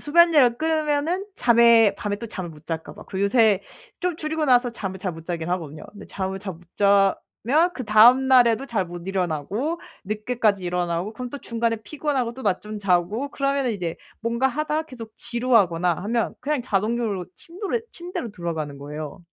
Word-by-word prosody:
수면약을 295 -6 +5
끊으면은 315 +4 0
잠에 235 -3 +5
밤에 205 -1 -3
또 230 +3 -7
잠을 185 -5 -6
못 155 -1 -16
잘까 160 -1 -5
봐. - - -11
그리고 195 +1 -1
요새 210 -2 +4 0.4
좀 360 -2 0
줄이고 310 0 -2
나서 245 -3 +4
잠을 190 -4 -5
잘 185 -1 -3
못 165 0 -11
자긴 170 -1 -3
하거든요. 160 -4 -4
근데 205 -1 -11
잠을 190 0 -4
잘 195 -1 -6
못 165 - -17 0.2
자면 205 - +2
그다음 245 +3 +5
날에도 245 -1 +5
잘 205 -8 -1
못 175 +1 -9
일어나고 195 - -2 0.2
늦게까지 215 -2 0
일어나고 175 +3 -1
그럼 250 0 -6
또 285 - -6
중간에 230 -2 -1
피곤하고 275 -4 -2
또 265 - -9
낮잠 210 +2 -2
자고 200 +7 +1
그러면은 275 -3 0
이제 175 -5 -4 0.2
뭔가 235 +3 +1
하다가 305 +3 -1
계속 230 -6 -10
지루하거나 210 -8 +2
하면 230 +1 -1
그냥 290 -2 -1
자동적으로 215 -3 -1
침도로 390 +6 -4
침대로 345 - -6
들어가는 160 -6 -4
거예요. 150 +4 -7
225 Hz, 380 characters per minute, -24 LUFS, 185-265 Hz, 0.4 s, 수면약을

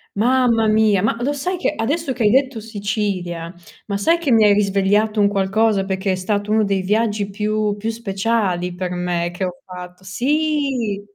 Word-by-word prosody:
Mamma 235 0 +2
mia, 215 -2 +3
ma 220 +3 +1
lo 270 +4 0
sai 290 +6 -2
che 360 - -1
adesso 285 +6 -2
che 250 -2 -2
hai 210 - +4
detto 265 -2 +2
Sicilia, 200 -6 -3 0.3
ma 200 - -3
sai 265 +13 +2
che 335 -4 -3
mi 225 -3 +5
hai 210 - +6
risvegliato 205 +1 +2
un 200 - +4
qualcosa, 200 +1 +1
perché 190 0 -1
è - - +1
stato 205 +3 -2
uno 215 0 +3
dei 195 -1 0
viaggi 210 +1 0
più 210 +1 -1
più 220 +2 -3
speciali 195 -4 -1
per 180 0 -4
me 175 -1 -2
che 185 +2 -2
ho 180 - -4
fatto 180 0 -10
sì! 265 0 -1
210 Hz, 185 wpm, -20 LUFS, 190-230 Hz, 0.3 s, hai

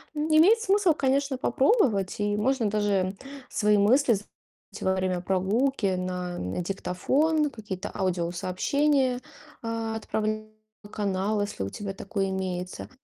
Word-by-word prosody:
Н 300 +1 -1
имеет 400 +9 +6
смысл, 395 -5 +3
конечно, 275 -1 0
попробовать 260 - +2
и 205 0 +1
можно 235 0 +1
даже 200 -2 0 0.3
свои 210 0 +2
мысли 240 +5 +4
з 205 0 -2 0.6
во 190 0 +1
время 185 -1 -1
прогулки 195 +3 +1
на, 180 -1 -3 0.2
э, - - 0
диктофон, 285 - +1
какие-то 205 -5 -6
аудиосообщения, 190 - 0 0.4
а, 225 -1 -3
отправлять 215 0 -2 0.4
на 205 - -12
канал, 205 +1 -1
если 205 - -4
у 95 - -3
тебя 195 - -5
такой 195 0 -2
имеется, 185 -1 -4
210 Hz, 130 wpm, -27 LUFS, 190-265 Hz, 0.6 s, имеет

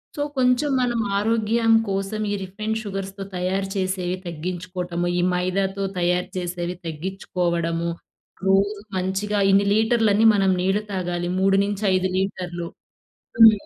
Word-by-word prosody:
So, 290 - -3 0.2
కొంచెం 250 +3 +3
మనం 240 -2 0 0.2
ఆరోగ్యం 225 +1 +2 0.2
కోసం 195 +2 -2
ఈ - - 0
రిఫైన్డ్ 215 +4 -3
షుగర్స్‌తో 195 -1 -5
తయారు 190 +2 -1
చేసేవి 185 -1 -1
తగ్గించుకోవటము. 175 +1 -4
ఈ - - +2
మైదాతో 190 +2 -1 0.2
తయారు 180 +1 +1
చేసేవి 175 0 -3
తగ్గిచ్చుకోవడము. 170 0 -2 0.6
రోజు 200 +2 +3 0.2
మంచిగా 195 +3 -1
ఇన్ని 200 +1 +4
లీటర్లనీ 220 -1 +3
మనం 195 -1 +3
నీళ్లు 190 +3 +1
తాగాలి. 175 -2 -2
3 195 0 +4
నుంచి 205 +1 -3
5 185 0 +2
లీటర్లు. 180 -3 -3 0.7
హ్మ్. 225 -1 +10
190 Hz, 125 wpm, -23 LUFS, 180-205 Hz, 0.7 s, హ్మ్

